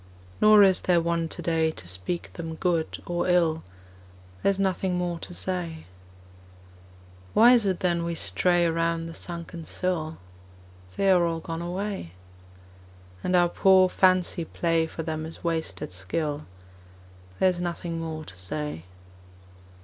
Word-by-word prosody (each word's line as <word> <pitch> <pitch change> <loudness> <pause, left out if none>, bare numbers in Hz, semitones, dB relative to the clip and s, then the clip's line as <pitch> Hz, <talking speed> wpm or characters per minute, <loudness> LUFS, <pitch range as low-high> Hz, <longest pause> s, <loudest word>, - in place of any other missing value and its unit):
Nor 215 -1 +8
is 190 -2 +4
there 175 -2 +3
one 170 0 0
today 160 -1 0
To 125 - -9
speak 95 - -4
them 165 -1 -6
good 170 -2 -1
or 175 0 -1
ill: 170 -3 +2 0.8
There - - +3
is 195 -1 0
nothing 190 -1 0
more 175 -1 -2
to - - -9
say. 175 -3 -4 1.5
Why 235 +3 +8
is 230 -5 +3
it 185 -2 -1
then 175 -2 +1
we 170 0 -2
stray 170 - +2
Around 165 0 0
the 165 - -7
sunken 170 0 -6
sill? 165 -2 -2 0.8
They 195 -1 +3
are 180 -2 +5
all 165 -1 -2
gone 165 0 -5
away. 180 - -4 1.1
And 180 - +1
our 175 -1 +4
poor 185 0 +5
fancy 185 -2 +2
play 165 0 0
For 165 - -6
them 155 -1 -3
is 160 +1 -9
wasted 160 - -3
skill: 145 - -3 0.9
There 190 - +4
is 180 -1 -2
nothing 170 -1 -3
more 160 -1 -5
to 90 - -11
say. 90 - -5
170 Hz, 145 wpm, -26 LUFS, 160-180 Hz, 1.5 s, Nor